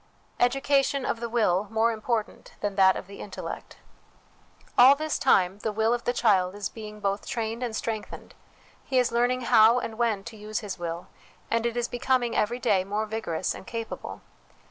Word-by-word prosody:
Education 275 +2 +2
of 230 - -1
the 235 0 -4
Will 210 -4 +1
more 225 +1 +2
important 220 0 -3
than 205 -1 -2
that 190 -1 +5
of - - -6
the 200 +1 -12
Intellect. 200 - -7 1.0
All 260 +3 +8
this 310 +1 -2
time, 190 -6 +3
the 215 - -2
will 220 +2 +1
of 240 - -3
the - - +2
child 200 -6 +2
is 205 -2 -3
being 210 -1 -9
both 200 0 -2
trained 225 0 -3
and 240 -3 -3
strengthened; 220 -1 -5 0.5
he 260 - -1
is 250 -1 +3
learning 245 +2 +1
how 230 -1 +6
and 230 -2 -4
when 220 -5 +1
to 230 +1 -9
use 215 +2 -4
his 200 -3 -6
will, 170 0 -4 0.5
and 230 +1 +2
it 235 0 -4
is 240 0 0
becoming 245 0 0
every 235 +3 +1
day 195 -6 +2
more 205 +3 -2
vigorous 210 -6 -2
and - - -11
capable. 230 -1 -6
225 Hz, 185 wpm, -27 LUFS, 205-240 Hz, 1.0 s, All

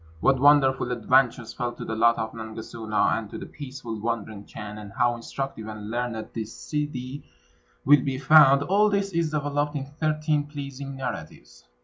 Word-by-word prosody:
What 135 +9 +3
wonderful 135 -3 +4
adventures 125 0 +2
fell 120 -1 -3
to - - -8
the 110 - -3
lot 115 +1 +4
of 110 0 -3
Nangasuna, 110 -1 -1
and 110 -2 -9
to - - -7
the - - -7
peaceful 130 -6 -7
wandering 110 -3 -3
Chan, 105 0 -8
and 105 -1 -9
how 120 0 +3
instructive 120 -1 -5
and 105 0 -7
learned 120 -2 -3
the 115 - -3
Ssidi 135 +3 -5 0.6
will 145 0 +7
be 135 -1 -2
found, 140 0 +7
all 205 +6 +3
this 200 -1 0
is 165 -2 0
developed 145 0 -1
in 140 -2 -3
thirteen 155 0 -1
pleasing 140 -2 -7
narratives. 75 - -7
130 Hz, 165 wpm, -26 LUFS, 110-145 Hz, 0.6 s, will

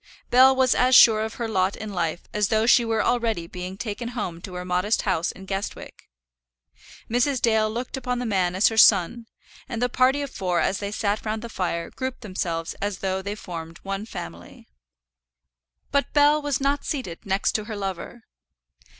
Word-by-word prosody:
Bell 260 +2 +7
was 260 -1 +3
as 255 +1 +4
sure 220 -3 +8
of 220 +1 -4
her 235 - -3
lot 190 -3 0
in 215 -1 -7
life 170 -1 -2
as 210 -1 +1
though 220 +2 +2
she 240 0 +5
were 225 -1 0
already 225 -8 0
being 180 +2 -7
taken 225 +2 -5
home 175 -6 -4
to 185 0 -8
her 180 0 -5
modest 180 +4 0
house 165 - 0
in 190 - -12
Guestwick. 195 +1 -6 1.0
Mrs. 250 +3 +1
Dale 220 -2 +3
already 215 - -3
looked 250 +2 -4
upon 250 -1 -2
the 245 - -3
man 185 -5 0
as 190 - +4
her 225 0 0
son, 215 +4 +5 0.4
and 235 -3 -4
the 245 +1 +1
party 260 +3 +2
of 280 - -6
four 180 -5 -1
as 195 - 0
they 200 - -3
sat 210 0 -1
round 215 0 -3
the 235 - -6
fire 170 -4 -3
grouped 260 -1 -5
themselves 175 -5 -3
as 200 -1 -2
though 190 0 -2
they 200 +1 -4
already - - -13
formed 165 -2 -7
one 195 +2 -4
family. 85 - -9 1.2
But 280 0 +1
Bell 295 +1 +4
was 290 -3 -1
not 280 +1 0
seated 245 - -5
next 195 +1 0
to 215 - -2
her 215 - -6
lover. 195 +3 -6
215 Hz, 195 wpm, -24 LUFS, 185-245 Hz, 1.2 s, sure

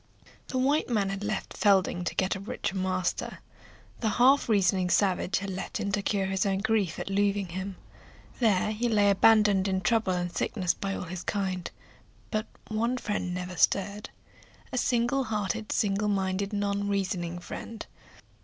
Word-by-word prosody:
The 260 - -3
white 280 +4 +2
man 205 -5 +1
had 195 +1 -4
left 215 -1 -3
Fielding 190 -3 +3
to - - -2
get 190 +2 +1
a - - -5
richer 195 0 -4
master. 185 -1 -1 0.6
The 220 - +1
half 250 +5 +4
reasoning 190 -3 +3
savage 190 0 +1
left 190 -1 -4
him 200 - -2
to 205 0 +1
cure 195 -1 0
his 190 0 0
own 195 -1 +1
grief 200 -4 0
at - - -5
losing 200 -1 +1
him. 190 +2 -5 0.6
There 215 -3 +3
he 235 +3 -1
lay 205 -2 +4
abandoned 205 -1 +5
in 190 -1 0
trouble 210 0 +2
and 175 -1 -3
sickness 185 -5 0
by 195 0 -3
all - - -4
his 180 0 -6
kind. 190 -3 -2 0.6
But 215 0 -1 0.2
one 230 +3 0
friend 205 -6 -2
never 180 0 -4
stirred; 200 +4 +1 0.6
a 255 - -3
single 245 +3 +1
hearted, 215 0 -2
single 205 -1 +1
minded, 195 0 0
non 200 -1 -1
reasoning 185 -3 -1
friend. 215 +5 -7
200 Hz, 165 wpm, -28 LUFS, 185-215 Hz, 0.6 s, abandoned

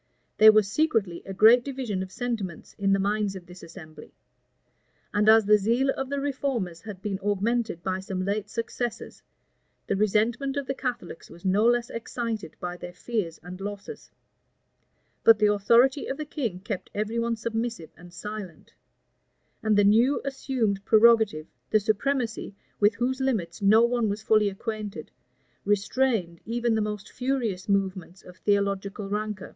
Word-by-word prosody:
There 215 0 +10
was 215 -2 +3
secretly 215 - 0
a 195 - -5
great 230 +4 +7
division 255 -8 -3
of 190 0 -6
sentiments 220 -9 -4
in 195 0 +2
the 195 - +4
minds 200 0 0
of 185 -2 -9
this 180 +1 -13
assembly; 165 -2 -12 1.0
and 210 +1 +3
as 220 -1 +7
the 210 +1 +5
zeal 235 +7 +2
of 270 -1 -4
the 280 0 -2
reformers 260 -11 -2
had 200 -4 -9
been 200 -3 -2
augmented 205 -2 -1
by 185 0 -1
some 190 -1 -4
late 205 +1 -2
successes, 235 +1 -4 0.6
the - - -1
resentment 225 +7 +1
of 280 - -2
the 270 - -2
Catholics 240 -11 -5
was 170 - -14
no 200 +4 +3
less 240 0 +1
excited 230 -5 -4
by 180 0 -5
their 175 - -9
fears 200 -7 -3
and 180 +2 -9
losses: 205 0 -7 1.1
but 225 -1 +7
the 210 -1 +3
authority 235 +7 +3
of 270 - -3
the 305 - -4
king 235 - -4
kept 200 -1 -5
every 215 +3 -1
one 230 0 0
submissive 225 -5 -4
and 175 +1 -14
silent; 200 -1 -8 0.9
and 220 -2 +2
the 205 - +5
new 230 +7 +4
assumed 255 -7 -1
prerogative, 220 -7 +4 0.2
the 215 - +4
supremacy, 225 0 -1 0.2
with 205 0 +4
whose 260 +3 -1
limits 215 -9 -1
no 215 +3 +6
one 235 -2 0
was 205 +2 -4
fully 215 -2 +3
acquainted, 210 +1 -6 0.5
restrained 205 -3 0
even 235 +1 -1
the 220 - +1
most 210 -1 -4
furious 245 -8 -2
movements 190 -2 -1
of 180 0 -14
theological 200 +1 -1
rancor. 210 -1 -4
210 Hz, 160 wpm, -26 LUFS, 195-235 Hz, 1.1 s, There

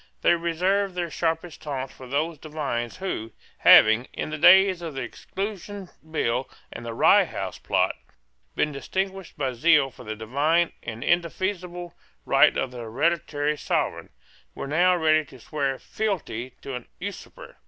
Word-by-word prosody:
They - - +6
reserved 180 +3 0
their 175 -2 -2
sharpest 165 0 -2
taunts 135 -3 -4
for 130 - -12
those 150 +4 -1
divines 145 -7 -4
who, 115 - -4 0.3
having, 110 +3 +7
in - - -4
the 155 - -3
days 190 +2 +7
of 165 -4 -6
the 135 - -3
Exclusion 195 - -6 0.2
Bill 130 -4 -1 0.2
and - - -8
the 115 -1 -5
Rye - - +6
House - - -5
Plot, - - +1 0.6
been 150 - +1
distinguished 190 +6 -4
by 135 -3 -1
zeal 140 +1 +4
for - - -13
the 110 0 -5
divine 145 +10 +1
and 115 0 -6
indefeasible 175 0 -1 0.3
right - - +5
of 130 - -1
the 125 - -8
hereditary 145 +5 0
Sovereign, - - -2 0.5
were - - -5
now 175 +6 +3
ready 155 -2 +3
to 130 -2 -15
swear 140 +1 -2
fealty 150 - -3
to 135 - -6
an 125 -1 -6
usurper. 205 - -8
155 Hz, 155 wpm, -25 LUFS, 130-175 Hz, 0.6 s, having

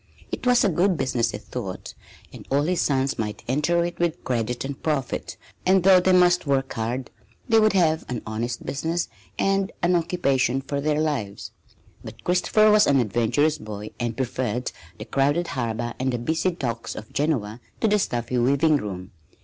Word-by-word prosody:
It - - -3
was 245 -1 +5
a 205 - +4
good 180 +1 +2
business, 120 -4 0
he - - -4
thought, - - -7 0.4
and - - -11
all 140 +1 +2
his 180 +3 0
sons 135 -1 0
might 105 0 -4
enter 150 +7 +1
it 175 0 -6
with 170 -2 -1
credit 120 0 -2
and 135 0 -6
profit; 150 -5 -2 0.3
and 185 -1 +4
though 190 -1 +7
they 185 +1 +2
must 180 -2 +4
work 135 -1 0
hard, 115 +3 -3 0.4
they 225 -2 +5
would 215 -1 +4
have 160 -4 +2
an 125 -2 -4
honest 115 +2 -4
business 165 +5 -2 0.3
and 195 0 +1
an 175 +1 +3
occupation 140 -7 +1
for 140 +1 -3
their 150 +1 +1
lives. 135 -11 -2 0.5
But - - -11
Christopher 210 +4 +3
was 210 0 +5
an 140 -1 +4
adventurous 120 +7 +1
boy 105 0 -7
and 120 -2 -2
preferred 125 -2 -2 0.3
the 105 - -7
crowded 145 +7 +1
harbor 120 -2 -2
and 130 +1 0
the 120 - -1
busy 160 +9 0
docks 120 -10 -4
of 110 - -9
Genoa 125 -7 -1 0.2
to 225 - +3
the 210 0 +3
stuffy 120 -6 -1
weaving 140 +5 +3
room. 95 -6 -6
140 Hz, 180 wpm, -24 LUFS, 120-175 Hz, 0.5 s, though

